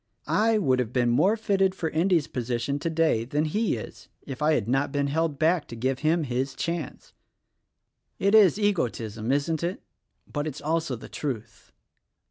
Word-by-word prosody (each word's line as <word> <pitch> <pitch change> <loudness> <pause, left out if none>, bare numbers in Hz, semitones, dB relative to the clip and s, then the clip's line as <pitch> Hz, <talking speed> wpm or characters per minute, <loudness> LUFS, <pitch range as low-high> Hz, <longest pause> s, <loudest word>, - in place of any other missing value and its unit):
I 220 +1 +2
would 130 -11 +2
have 125 -2 -1
been 125 -1 +2
more 195 - +3
fitted 195 -3 +1
for 160 -4 -3
Endy's 165 -1 +2
position 125 +3 -2
today 160 -7 +1
than 145 +6 -1
he 210 +8 0
is - - -10 0.2
if 135 -2 -7
I 155 +1 +3
had 110 -6 -1
not 135 +4 +1
been 145 -1 0
held 155 +1 0
back 160 +1 +2
to 115 - -8
give 130 +3 -1
him 160 +2 +2
his 130 0 -2
chance. 170 +1 -4 1.0
It 200 +1 +1
is 205 -4 +6
egotism, 120 - -1
isn't 145 +3 0
it 175 +3 -3 0.2
— - - -50
but, 145 0 -2
it's 145 -2 -5
also 160 -2 -1
the 115 - -10
truth. 115 -5 -6
150 Hz, 175 wpm, -26 LUFS, 125-170 Hz, 1.0 s, is